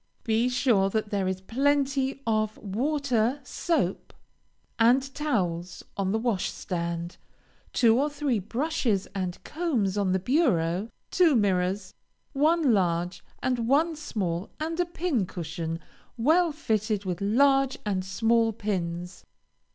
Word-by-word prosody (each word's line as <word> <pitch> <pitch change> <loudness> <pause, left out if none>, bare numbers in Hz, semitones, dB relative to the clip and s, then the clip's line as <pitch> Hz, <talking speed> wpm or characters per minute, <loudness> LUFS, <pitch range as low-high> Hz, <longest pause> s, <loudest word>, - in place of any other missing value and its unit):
Be 230 +2 +2
sure 240 -6 +3
that 215 0 -2
there 195 -2 0
is 185 0 -2
plenty 275 +3 0
of 215 -1 0
water, 250 +3 0
soap 255 - -1 0.6
and 260 +4 +4
towels 180 - -2
on 195 -1 -1
the 220 - +1
washstand, 175 -6 -2 0.5
two 235 -1 +4
or 295 - +1
three 285 -6 -1
brushes 230 - -1
and 185 -3 -3
combs 245 - -1
on 195 -2 +1
the 190 - +3
bureau, 195 - +1 0.2
two 340 -6 +4
mirrors, 190 -2 +1 0.4
one 305 -1 +3
large 175 -2 0 0.2
and 245 -3 0
one 315 +5 +3
small, 195 - -3
and 325 +2 -3
a 355 - +2
pin 325 - -1
cushion, 165 -2 -4 0.4
well 320 +8 +3
filled 215 -8 -1
with 180 -1 -3
large 270 +5 +3
and 190 -3 0
small 225 +4 +2
pins. 180 -4 -4
225 Hz, 125 wpm, -27 LUFS, 190-275 Hz, 0.6 s, and